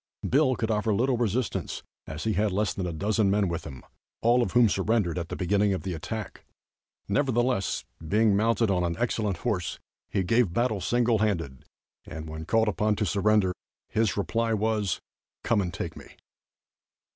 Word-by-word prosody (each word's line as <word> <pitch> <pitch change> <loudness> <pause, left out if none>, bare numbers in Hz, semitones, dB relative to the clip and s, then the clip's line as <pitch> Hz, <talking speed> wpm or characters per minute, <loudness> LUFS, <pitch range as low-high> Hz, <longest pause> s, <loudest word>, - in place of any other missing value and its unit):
Bill 135 -1 +3
could 110 -1 -1
offer 105 0 +1
little 125 +4 +2
resistance, 120 +1 -2 0.2
as 80 +1 -6
he 110 - +1
had 105 0 +1
less 105 +2 0
than 95 -2 -3
a - - -2
dozen 100 +5 +1
men 100 0 +2
with 85 -1 -3
him, 65 -3 -9 0.4
all 120 +2 +4
of 100 - -1
whom 120 -1 +6
surrendered 95 -3 +1
at 85 - -5
the - - -4
beginning 100 +2 +2
of - - -5
the 95 -1 -3
attack. 105 +5 -6 0.6
Nevertheless, 120 -2 +1 0.2
being 105 +2 +3
mounted 115 0 +2
on 90 -2 +1
an 85 -1 -1
excellent 110 -5 -1
horse, 90 -5 -1 0.3
he 95 - 0
gave 110 -1 +2
battle 110 -2 0
single 120 +2 +2
handed, 85 -11 -1 0.4
and 80 0 -7
when 80 0 -6
called 110 +5 +2
upon 105 +1 +1
to 105 - -1
surrender, 100 0 +2 0.4
his 110 -2 +1
reply 115 +2 0
was: 105 -3 0 0.4
"Come 110 -3 +2
and 90 -2 -2
take - - -5
me." - - -11
105 Hz, 175 wpm, -27 LUFS, 95-115 Hz, 0.6 s, whom